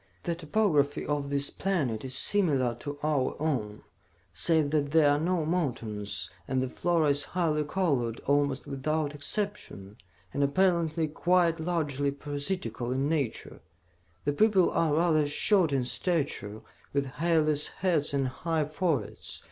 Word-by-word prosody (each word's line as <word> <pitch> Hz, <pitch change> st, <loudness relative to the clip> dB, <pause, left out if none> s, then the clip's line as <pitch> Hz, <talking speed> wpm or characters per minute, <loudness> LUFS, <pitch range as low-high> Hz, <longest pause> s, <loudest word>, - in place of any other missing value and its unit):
"The 170 Hz, -, -1 dB
topography 155 Hz, -4 st, +1 dB
of 145 Hz, -1 st, -2 dB
this 140 Hz, 0 st, +1 dB
planet 145 Hz, -, -1 dB
is 130 Hz, -1 st, -3 dB
similar 140 Hz, -10 st, +2 dB
to 145 Hz, +1 st, -6 dB
our 150 Hz, -4 st, +1 dB
own, 120 Hz, -9 st, -2 dB, 0.5 s
save 160 Hz, -4 st, +3 dB
that 145 Hz, -2 st, +1 dB
there 150 Hz, -1 st, +5 dB
are 145 Hz, -, +2 dB
no 170 Hz, 0 st, 0 dB
mountains, 110 Hz, -, -2 dB, 0.2 s
and 130 Hz, 0 st, 0 dB
the 130 Hz, 0 st, -1 dB
flora 165 Hz, +1 st, +1 dB
is 145 Hz, 0 st, +3 dB
highly 155 Hz, -4 st, +1 dB
colored 140 Hz, -9 st, -1 dB
almost 140 Hz, -1 st, +1 dB
without 150 Hz, +2 st, -2 dB
exception, 145 Hz, -, -4 dB, 0.4 s
and 140 Hz, -, +1 dB
apparently 165 Hz, 0 st, +2 dB
quite 170 Hz, +1 st, +2 dB
largely 150 Hz, -5 st, -1 dB
parasitical 140 Hz, -, -3 dB
in 135 Hz, +2 st, 0 dB
nature. 145 Hz, -8 st, -2 dB, 0.6 s
The 145 Hz, -, +1 dB
people 195 Hz, +1 st, +4 dB
are 155 Hz, -3 st, +1 dB
rather 155 Hz, -2 st, +3 dB
short 170 Hz, +3 st, +3 dB
in 135 Hz, -3 st, 0 dB
stature, 125 Hz, -, -2 dB, 0.3 s
with 140 Hz, 0 st, +1 dB, 0.2 s
hairless 155 Hz, -3 st, +2 dB
heads 170 Hz, -6 st, 0 dB
and 140 Hz, -2 st, 0 dB
high 160 Hz, +4 st, -1 dB
foreheads. 155 Hz, -, -2 dB
150 Hz, 140 wpm, -28 LUFS, 140-165 Hz, 0.6 s, there